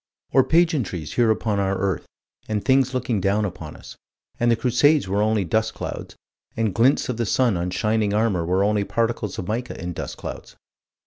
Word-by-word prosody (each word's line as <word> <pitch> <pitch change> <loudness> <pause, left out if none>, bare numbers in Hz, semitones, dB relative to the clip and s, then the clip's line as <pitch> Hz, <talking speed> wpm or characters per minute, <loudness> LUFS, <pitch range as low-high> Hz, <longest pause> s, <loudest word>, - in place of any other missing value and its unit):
Or 135 +1 +5
pageantries 150 - +1
here 120 -2 +3
upon 110 -2 0
our 95 0 0
earth, 95 -2 -2 0.4
and 105 -2 -2
things 130 -1 +3
looking 120 -5 -1
down 100 +3 +1
upon 85 -5 -7
us - - -12 0.4
and 120 - +2
the 115 - +4
Crusades 130 +2 +3
were 100 +2 0
only 105 -2 +1
dust 110 +6 0
clouds, - - -6 0.4
and 110 -4 0
glints 125 +7 +3
of 125 - -3
the 120 - 0
sun 125 -4 +2
on 85 +1 -2
shining 105 +3 0
armor 105 -4 +1
were 90 +3 +1
only 105 0 +2
particles 115 -2 -2
of 90 - -5
mica 120 +3 -3
in 90 +1 -4
dust - - -6
clouds. - - -8
110 Hz, 190 wpm, -23 LUFS, 95-120 Hz, 0.4 s, Or